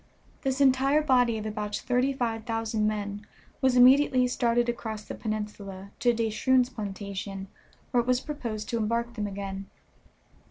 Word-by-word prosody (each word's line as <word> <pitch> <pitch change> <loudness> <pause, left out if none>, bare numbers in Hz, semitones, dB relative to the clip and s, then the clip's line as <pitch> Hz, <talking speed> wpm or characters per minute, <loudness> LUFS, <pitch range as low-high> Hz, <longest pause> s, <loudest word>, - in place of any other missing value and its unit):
This 265 -1 -1
entire 275 +2 +4
body 245 -5 +3
of 215 - -5
about 210 -1 -3
thirty 250 +2 +1
five 230 -4 -2
thousand 225 -2 0
men 205 -1 -3 0.4
was 260 -1 +3
immediately 255 0 +6
started 240 -1 +1
across 220 -3 -4
the - - -7
peninsula 205 -3 -5
to 245 - +4
De 225 -1 -1
Shroon's 255 +3 +2
plantation, 200 -3 -5 0.4
where 245 - +4
it 235 - -8
was 250 -1 +3
proposed 235 -8 -5
to 235 - 0
embark 235 +2 -1
them 210 -3 -3
again. 195 -1 -6
230 Hz, 155 wpm, -28 LUFS, 210-250 Hz, 0.4 s, immediately